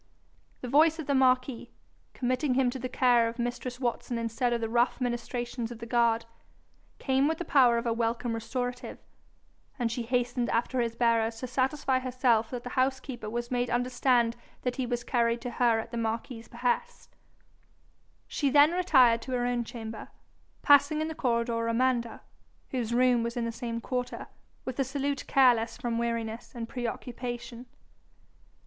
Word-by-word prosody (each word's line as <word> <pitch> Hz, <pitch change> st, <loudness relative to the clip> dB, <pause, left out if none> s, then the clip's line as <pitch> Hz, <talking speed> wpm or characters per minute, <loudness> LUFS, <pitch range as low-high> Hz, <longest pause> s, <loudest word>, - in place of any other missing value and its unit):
The 250 Hz, -, -5 dB
voice 310 Hz, +5 st, +4 dB
of 320 Hz, -, -5 dB
the 280 Hz, -, 0 dB
marquis, 255 Hz, -2 st, +2 dB, 0.5 s
committing 255 Hz, +2 st, 0 dB
him 255 Hz, -2 st, +2 dB
to 260 Hz, -, -6 dB
the 255 Hz, +1 st, -4 dB
care 245 Hz, -3 st, +3 dB
of 230 Hz, -, -9 dB
mistress 245 Hz, +1 st, -4 dB
Watson 240 Hz, -1 st, -2 dB
instead 230 Hz, +2 st, -1 dB
of 235 Hz, -, 0 dB
the 225 Hz, -, -2 dB
rough 240 Hz, +2 st, +1 dB
ministrations 240 Hz, -1 st, -3 dB
of 240 Hz, -, -7 dB
the 230 Hz, -, -8 dB
guard, 230 Hz, -1 st, +2 dB, 0.7 s
came 270 Hz, +1 st, +1 dB
with 320 Hz, 0 st, 0 dB
the 350 Hz, -, -5 dB
power 250 Hz, -6 st, +5 dB
of 235 Hz, -, -2 dB
a 230 Hz, -, +1 dB
welcome 230 Hz, +1 st, -1 dB
restorative, 245 Hz, +2 st, -4 dB, 0.8 s
and 240 Hz, -3 st, -1 dB
she 240 Hz, -, -3 dB
hastened 245 Hz, 0 st, -1 dB
after 240 Hz, +2 st, 0 dB
his 230 Hz, -1 st, -2 dB
bearers 230 Hz, -1 st, +2 dB
to -, -, -2 dB
satisfy 260 Hz, +1 st, 0 dB
herself 250 Hz, -3 st, +1 dB
that 245 Hz, -2 st, -5 dB
the 245 Hz, -, -6 dB
housekeeper 260 Hz, -3 st, -1 dB
was 240 Hz, +2 st, -4 dB
made 245 Hz, -1 st, 0 dB
understand 245 Hz, -1 st, +2 dB, 0.3 s
that 250 Hz, 0 st, -2 dB
he 260 Hz, -2 st, -1 dB
was 240 Hz, 0 st, -2 dB
carried 235 Hz, -2 st, +1 dB
to 245 Hz, 0 st, -5 dB
her 235 Hz, -2 st, +2 dB
at 230 Hz, -, -7 dB
the 235 Hz, -, -4 dB
marquis's 225 Hz, +1 st, -3 dB
behest. 245 Hz, -, -3 dB, 1.1 s
She 285 Hz, -, 0 dB
then 290 Hz, +3 st, +6 dB
retired 265 Hz, -10 st, +4 dB
to 260 Hz, +2 st, -6 dB
her 245 Hz, -1 st, 0 dB
own 245 Hz, -1 st, 0 dB
chamber, 225 Hz, -2 st, -7 dB, 0.6 s
passing 285 Hz, +2 st, +5 dB
in, 315 Hz, -, -2 dB
the -, -, -4 dB
corridor 235 Hz, -4 st, 0 dB
Amanda, 235 Hz, 0 st, 0 dB, 0.5 s
whose 240 Hz, -4 st, -2 dB
room 245 Hz, 0 st, +3 dB
was 235 Hz, +1 st, -3 dB
in 235 Hz, -, -1 dB
the, 230 Hz, -, -2 dB
same 230 Hz, 0 st, -4 dB
quarter, 250 Hz, +1 st, -4 dB, 0.4 s
with 260 Hz, +1 st, -5 dB
a -, -, +4 dB
salute 275 Hz, +1 st, -3 dB
careless 245 Hz, -4 st, +3 dB
from 235 Hz, -1 st, -2 dB
weariness 230 Hz, -1 st, -3 dB
and 230 Hz, -1 st, -5 dB
preoccupation. 240 Hz, 0 st, -5 dB
245 Hz, 170 wpm, -28 LUFS, 235-255 Hz, 1.1 s, then